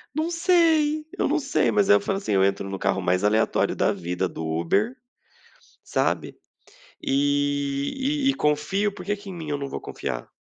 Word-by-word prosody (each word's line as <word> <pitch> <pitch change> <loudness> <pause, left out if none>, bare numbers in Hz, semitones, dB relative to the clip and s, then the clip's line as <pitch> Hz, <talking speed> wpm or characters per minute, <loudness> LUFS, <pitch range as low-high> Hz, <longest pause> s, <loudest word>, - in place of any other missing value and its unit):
Não 315 +2 0
sei, 325 -3 +3
eu - - +1
não 310 +2 +1
sei, 275 0 +1
mas 205 -1 +2
aí 205 - +8
eu 205 - +2
falo, 195 -1 -1
assim: 195 - -2
"Eu 95 0 +4
entro 100 0 0
no 95 0 -5
carro 95 - 0
mais 90 +1 +1
aleatório 110 +2 +2
da - - +2
vida 90 +2 -2
do 80 - -6
Uber, 85 - 0 0.9
sabe, - - -1 0.7
e 145 - 0
e - - +6
e - - -2
confio, 170 - 0
porque 205 +1 -3
que 200 -1 -10
em - - -7
mim 160 -3 -6
eu 145 - -1
não 140 -1 -4
vou - - -5
confiar?". - - -5
160 Hz, 190 wpm, -24 LUFS, -, 0.9 s, aí